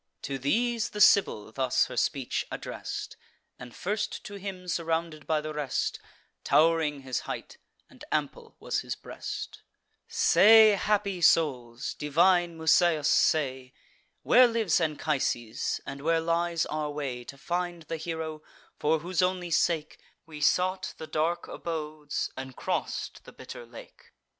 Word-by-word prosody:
To 135 -1 -3
these 235 - 0
the 210 - -7
Sibyl 150 - +4
thus 130 +1 +1
her - - -8
speech 135 -4 -1
address'd, - - -6 0.4
And 125 -1 -10
first 205 +3 -3
to 215 -4 -9
him 195 -2 -7
surrounded 165 -2 -2
by 155 -1 +1
the 155 0 -5
rest 150 -3 -2 0.4
Tow'ring 160 -3 +3
his 130 -2 -2
height, - - -6 0.3
and - - -16
ample - - -3
was - - -1
his - - -4
breast; - - -7 0.5
"Say, 220 +2 +7
happy 200 -2 0
souls, 125 -8 +2
divine 170 +3 +2
Musaeus, 160 -1 +3
say, 130 -4 +1 0.5
Where 250 0 +7
lives 225 -8 +1
Anchises, 145 -7 -1
and 140 0 -7
where 165 +2 +2
lies 170 0 0
our 150 -1 -3
way 140 -4 -4
To 140 - -10
find 175 +2 -3
the 165 +1 -5
hero, 160 -1 -5 0.4
for 155 +1 +1
whose 180 +2 -1
only 180 -1 0
sake 155 -1 0 0.3
We 155 -2 -10
sought 185 +4 +1
the - - -7
dark 155 +2 -1
abodes, 155 -3 -4
and 130 -1 -7
cross'd - - -3
the - - -11
bitter 120 - -10
lake?" 115 - -14
160 Hz, 140 wpm, -28 LUFS, 145-180 Hz, 0.5 s, Say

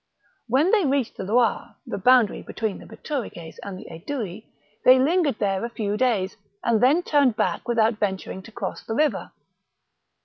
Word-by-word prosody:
When 275 +10 +3
they 425 -4 +4
reached 275 -5 0
the - - -4
Loire 225 +3 +1
— - - -52
the - - -4
boundary 250 0 +4
between 220 -3 -4
the - - -13
Bituriges 225 - -6
and 200 -2 -7
the - - -10
Aedui 210 - -6 0.2
— 210 - -39
they 255 +1 +8
lingered 295 -1 +2
there 195 -1 0
a 235 - -2
few 210 -3 -2
days, 210 -6 0 0.3
and 230 -2 +2
then 290 +8 +4
turned 280 -8 +3
back 220 - -1
without 225 -2 +2
venturing 190 -2 -3
to 225 - -14
cross - - -5
the 225 - -4
river. 300 +3 0
230 Hz, 180 wpm, -24 LUFS, 205-265 Hz, 0.3 s, they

